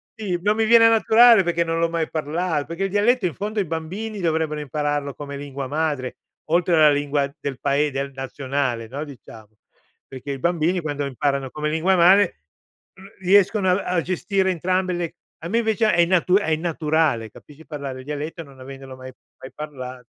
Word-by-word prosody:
Sì, 200 -6 -3
non 210 +3 +2
mi 225 0 +1
viene 230 0 +7
naturale 225 -1 +6
perché 170 -1 0
non 165 0 -2
l'ho 165 0 +1
mai 165 -1 -2
parlato, 155 0 -2
perché 170 +4 -3
il - - -2
dialetto 210 +2 +2
in 165 - -6
fondo 210 +1 -3
i 195 - 0
bambini 185 +7 -5
dovrebbero 160 -3 -1
impararlo 145 0 -2
come 140 0 -7
lingua 140 -1 -6
madre, 145 -3 -2 0.3
oltre 170 +2 +1
alla 155 -2 +6
lingua 145 -1 0
del 135 -2 -5
pae 145 +2 +1
del 140 +1 -3
nazionale, 135 -3 -3
no, 140 +5 -5
diciamo, 115 -6 -12 0.6
perché 135 +1 -7
i 135 - -5
bambini 175 +3 0
quando 145 -2 -3
imparano 140 0 -2
come 150 0 -3
lingua 165 +5 +2
madre 185 +2 +5 0.6
r 190 - -18 0.2
riescono 195 +1 +3
a 185 +2 +1
a 170 - +2
gestire 190 +2 0
entrambe 185 +1 -1
le 175 -2 -4 0.3
a 165 - -5
me 230 +5 +1
invece 220 -1 +1
è 170 - +3
innatu 180 +1 +3
è 200 -6 +2
innaturale, 155 -7 0
capisci, 150 +7 -16
parlare 140 -4 -6
il 130 - -11
dialetto 150 +3 -5
non 135 -3 -17
avendolo 135 0 -10
mai 130 0 -10 0.3
mai 130 - -10
parla 130 -4 -8
160 Hz, 185 wpm, -22 LUFS, 140-185 Hz, 0.6 s, viene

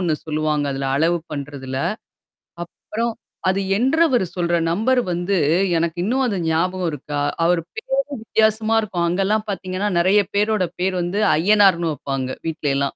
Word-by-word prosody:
1 170 -4 +1
சொல்லுவாங்க, 155 -1 0
அதுல 135 0 -2
அளவு 170 +2 +2
பண்றதுல. 140 -2 -5 0.9
அப்புறம் 230 +6 -4 0.4
அது 195 +1 +1 0.2
என்றவர் 265 - +3
சொல்ற 175 -1 0 0.2
நம்பர் 250 +7 +2
வந்து 175 +3 0 0.4
எனக்கு 170 0 -2
இன்னும் 260 +5 +1
அது 200 -5 -1
ஞாபகம் 180 +2 0
இருக்கா? 145 +1 -4 0.2
அவரு 175 0 +3
பேரு - - -3 0.3
வித்தியாசமா 220 0 +2
இருக்கும். 180 -5 -2
அங்கல்லாம் 195 +5 0
பாத்தீங்கன்னா, 185 +2 -3
நெறைய 190 +4 +4 0.2
பேரோட 210 -1 +2 0.2
பேரு 185 0 0
வந்து 195 +5 -1
அய்யனார்ன்னு 185 -2 +4
வைப்பாங்க, 135 -2 -4 0.2
வீட்லயெல்லாம். 140 -4 -1
185 Hz, 135 wpm, -21 LUFS, 160-215 Hz, 0.9 s, நெறைய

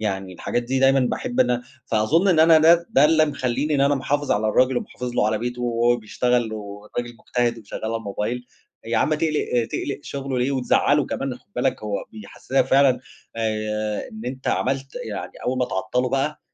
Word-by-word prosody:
يعني 95 -3 -3
الحاجات 120 +6 -2
دي 130 +2 -1
دايمًا 135 +1 +4
باحب 245 - -1
إن 125 - +2 0.2
فأظن 135 - +2
إن 165 -4 +4
أنا 160 0 +7
ده 170 +2 +5
ده 140 - +5
اللي 155 0 +5
مخلّيني 140 +1 -1
إن 140 - +2
أنا 140 +1 +4
محافظ 145 +2 -1
على 110 +1 +1
الراجل 130 +3 +3
ومحافظ 125 0 -4
له 105 - +2
على 110 0 0
بيته، 125 +2 -4
وهو 120 0 +2
بيشتغل 120 +1 0
والراجل 105 +3 -6
مجتهد 120 0 -1
وشغال 110 0 -8
على 115 +1 -1
الموبايل، 115 +3 -4 0.4
يا 115 +1 -1
عم 155 - +2
تقلِق 150 -7 0
تقلِق 140 - -3
شغله 135 -2 -4
ليه 125 +2 +1
وتزعّله 135 +2 +2
كمان، 135 -2 -3
خد - - -32
بالك 130 -1 0
هو 105 -1 -3
بيحسّسك 110 +5 -2
فعلًا، 135 -2 +4 0.4
آآ 110 -1 -2
إن 110 +1 -8
أنت 130 +2 -4
عملت 135 +1 -1
يعني 105 - -5
أول 130 +1 0
ما 125 - +2
تعطّلُه 125 +5 -1
بقى، 135 +4 -1
125 Hz, 185 wpm, -23 LUFS, 110-135 Hz, 0.4 s, أنا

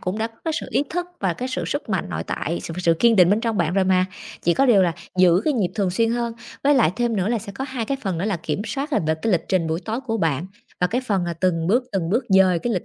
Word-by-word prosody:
cũng 185 +4 -3
đã 225 - 0
có 225 - -15
cái 325 - 0
sự - - -7
ý - - +2
thức 355 +1 -2
và 190 -3 +1
cái 255 +8 -4
sự 255 - -3
sức 285 - -3
mạnh 190 - -1
nội 80 0 -3
tại, 170 +3 -3
sự 165 - -6
sự 170 -2 +3
kiên 230 +6 +4
định 180 0 +6
bên 210 - +3
trong 230 -2 -1
bạn 170 0 0
rồi 195 -1 +3
mà, 185 0 +3 0.4
chỉ 170 - +2
có 275 - +3
điều 210 -6 +6
là 175 -2 +2 0.3
giữ 180 -1 +5
cái 305 - +2
nhịp 210 -9 0
thường 195 -4 0
xuyên 225 +5 +1
hơn. 235 -1 -1 0.3
Với 290 +1 +5
lại 225 -10 +4
thêm 235 -2 0
nữa 190 +2 0
là 235 - +1
sẽ 200 -1 -9
có 265 +7 -4
hai 250 -4 -3
cái 275 - -2
phần 185 -5 -2
nữa 185 - -2
là 205 -4 0
kiểm 185 +4 -3
soát, 285 +2 -3
ờ, - - +2
về 160 - +2
cái 225 - +1
lịch 165 -3 +1
trình 180 -4 +1
buổi 160 +2 -1
tối 225 +3 -2
của 225 -4 -2
bạn 165 -2 0 0.3
và 180 - +4
cái 245 +7 -1
phần, 200 -8 -1
ờ, 170 - -2
từng 165 -3 +1
bước 245 +7 +2
từng 180 -4 -1
bước 235 +4 +1
dời 190 -3 +5
cái 240 +6 -2
lịch 180 - -2
195 Hz, 315 wpm, -22 LUFS, 175-235 Hz, 0.4 s, định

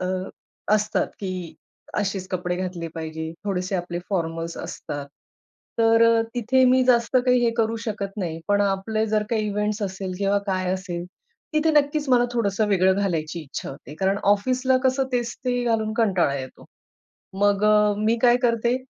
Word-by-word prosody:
अ, 185 - -2 0.7
असतात 210 0 0
की 195 -2 -3 0.7
अशेच 195 -2 -2
कपडे 180 -1 -2
घातले 180 -2 -4
पाहिजे. 160 0 -5
थोडेसे 185 -1 -2
आपले 175 0 -4
फॉर्मल्स 165 -2 -2
असतात. 145 -1 -6 0.7
तर 225 0 +5
अ, 230 0 +5
तिथे 250 +2 +3
मी 255 0 +4
जास्त 245 +1 +3
काही 250 -1 +4
हे 235 - +3
करू 225 0 +1
शकत 200 -2 -4
नाही 165 -4 -3
पण 205 0 +3
आपले 205 +2 0
जर 215 0 +1
काही 220 -2 0
इव्हेंट्स 210 +1 -1
असेल 190 -1 -4
किंवा 200 0 +2
काय 185 -1 0
असेल 180 -2 -4 0.5
तिथे 310 +1 +2
नक्कीच 295 0 +2
मला 245 -2 +5
थोडंसं 215 -3 +1
वेगळं 190 -1 +3
घालायची 170 -3 -2
इच्छा 140 - -6
होते 140 +1 -11
कारण 195 +1 +2
ऑफिसला 255 +5 +1
कसं 260 +1 +2
तेच 240 -1 -1
ते 245 -1 0
घालून 220 -2 0
कंटाळा 185 -10 +2
येतो. 130 -1 -9 0.8
मग 205 0 +3
अ, 210 -1 +4
मी 220 +2 +2
काय 240 -1 +6
करते 235 +1 +2
205 Hz, 160 wpm, -24 LUFS, 185-230 Hz, 0.8 s, काय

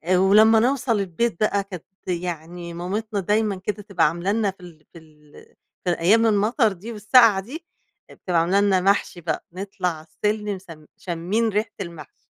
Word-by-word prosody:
ولمّا 210 +4 +6
نوصل 245 -2 +1
البيت 195 +2 -2
بقى 205 -2 +1
كانت 185 -4 -9 0.2
يعني 175 -1 -5
مامتنا 205 +5 -3
دايمًا 210 +2 +1
كده 200 +2 -5
تبقى 200 -6 +2
عاملة 170 +5 -2
لنا 210 -2 +1
في 190 - -29
ال 160 -3 -14
في 170 - -11
ال 150 -2 -22 0.5
في 180 - +1
أيام 215 +7 +4
المطر 220 +2 +2
دي 200 +6 -9
والسقعة 220 -1 +5
دي، 280 - -8 0.5
بتبقى 175 -3 -1
عاملة 185 +4 +2
لنا 195 -2 +3
محشي 195 -2 +1
بقى 160 -2 -3
نطلع 190 0 -4
على 160 -1 -9
السلِّم 210 +5 -2
س 190 - -22 0.3
شامين 185 +6 -1
ريحة 210 +1 -1
المحشي، 170 -4 -10
195 Hz, 165 wpm, -23 LUFS, 175-215 Hz, 0.5 s, ولمّا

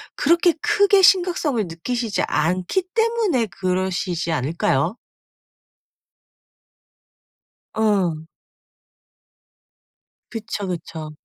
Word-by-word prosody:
그렇게 340 +3 +3
크게 405 -2 +4
심각성을 350 - +3
느끼시지 220 +6 -3
않기 185 - 0
때문에 450 - +1
그러시지 180 -1 -2
않을까요? 160 - 0 2.8
응. 190 -8 0 2.0
그쵸. 220 -3 -5
그쵸. 160 -3 -6
210 Hz, 165 characters per minute, -21 LUFS, -, 2.8 s, 크게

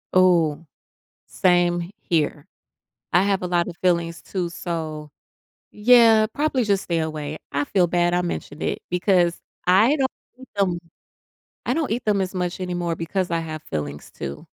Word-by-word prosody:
Ooh. 170 -4 +4 0.6
Same 175 -1 +2
h 170 - -8
here. 155 -3 -1 0.7
I 180 +2 +5
have 200 -1 +1
a 180 - -2
lot 175 -1 +1
of 175 - -6
fillings 170 -2 +1
too, 180 -3 -3
so, 160 -4 -5 0.6
yeah, 225 -1 +6
probably 285 -4 +1
just 200 -3 +1
stay 170 -2 -1
away. 155 -1 -3
I 145 +1 0
feel 180 +1 +2
bad 175 0 +1
I 180 - +2
mentioned 160 -3 -5
it - - -1
because 180 -1 +2 0.3
I 210 +11 +5
don't 265 -1 +1 0.3
eat 260 - -12
them 185 -4 +1 0.9
I 250 - +1
don't 320 -3 -1
eat 240 +3 -2
them 205 -2 +2
as 185 -1 -2
much 180 0 -2
anymore 175 -2 -2
because 175 +3 -2
I 165 - +1
have 155 -1 -6
fillings 75 - -5
too 70 +1 -7
175 Hz, 165 wpm, -23 LUFS, 165-195 Hz, 0.9 s, yeah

